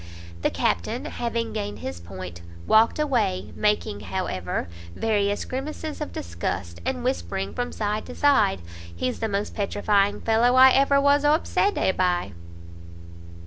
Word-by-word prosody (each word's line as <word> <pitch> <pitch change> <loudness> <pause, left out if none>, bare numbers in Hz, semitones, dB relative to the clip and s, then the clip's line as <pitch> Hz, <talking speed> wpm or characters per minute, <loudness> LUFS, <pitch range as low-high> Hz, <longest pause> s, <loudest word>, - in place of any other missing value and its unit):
The - - +2
Captain, 85 - -1
having 230 -2 -3
gained 205 -1 -4
his 90 -1 -6
point, 85 0 -8 0.2
walked 220 +1 +4
away, 235 -11 0
making, 210 - 0
however, 95 -2 -3 0.3
various 205 -2 0
grimaces 300 +4 -5
of 300 - -4
disgust, 85 0 -4
and 85 -1 -2
whispering 90 +3 -2
from 245 0 -3
side 210 0 -2
to - - -8
side 220 - +3 0.3
"he's 125 +9 -2
the 225 - -1
most 200 +1 -2
petrifying 205 -1 +1
fellow 230 +2 +3
I 260 0 +8
ever 275 +1 +4
was 285 +1 +4
obsedé 300 - +2
by!" 180 - 0
210 Hz, 135 wpm, -25 LUFS, -, 0.3 s, I